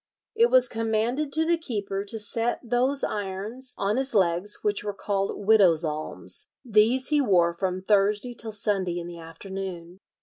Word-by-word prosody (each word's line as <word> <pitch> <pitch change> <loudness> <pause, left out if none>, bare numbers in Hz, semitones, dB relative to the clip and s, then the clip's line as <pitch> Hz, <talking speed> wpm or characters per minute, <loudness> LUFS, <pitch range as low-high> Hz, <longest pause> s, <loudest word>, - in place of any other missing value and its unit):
"It 465 +1 +4
was 255 -1 +5
commanded 230 +5 -1
to 320 +1 +2
the 340 0 +2
keeper 200 -9 -3
to 225 +2 -4
set 230 +2 -2
those 255 +4 +1
irons 210 +6 -2
on 205 +4 0
his 265 -2 0
legs 185 +1 +2
which 205 -1 0
were 205 -1 -4
called 195 -1 -2
widows' 190 -7 +5
alms; 150 - -3 0.2
these 235 +4 +3
he 300 -1 +3
wore 175 -8 +3
from 185 +1 -3
Thursday 210 +4 +2
till 225 -1 -5
Sunday 195 -4 -1
in 170 - -6
the 170 -1 -9
afternoon." 180 +1 -8
205 Hz, 165 wpm, -26 LUFS, 185-240 Hz, 0.2 s, was